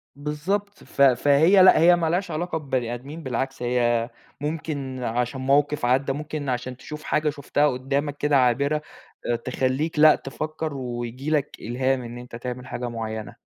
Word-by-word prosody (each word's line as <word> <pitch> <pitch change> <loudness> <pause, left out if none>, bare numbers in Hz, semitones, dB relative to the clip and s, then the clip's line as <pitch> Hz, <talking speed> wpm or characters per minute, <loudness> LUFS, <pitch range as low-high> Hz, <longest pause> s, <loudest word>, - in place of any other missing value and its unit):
بالضبط. 185 +8 -3
ف - - -5
فهي 145 +8 +6
لأ. 185 - +7
هي 175 +2 +7
مالهاش 175 +2 -1
علاقة 165 +2 -2
ببني 130 -6 -2
آدمين 140 +7 -8
بالعكس، 130 +1 -3
هي 120 -1 +1 0.3
ممكن 145 -4 -4
عشان 125 +3 -2
موقف 145 +1 +2
عدّى، 135 +2 +2
ممكن 150 -1 -4
عشان 125 0 -3
تشوف 150 +3 -9
حاجة 150 0 +1
شُفتها 145 0 +1
قدامك 140 +2 -2
كده 145 -1 +2
عابرة 140 +4 +2 0.4
أ 120 - +1
تخلّيك 130 +6 -1
لأ 155 0 +8
تفكّر، 155 +2 -5
وييجي 125 +1 -5
لك 150 -2 0
إلهام 130 +3 0
إن 120 0 -8
أنت 120 -1 -10
تعمل 125 +1 -6
حاجة 120 0 -4
معيّنة. 110 -2 -5
140 Hz, 155 wpm, -24 LUFS, 125-150 Hz, 0.4 s, لأ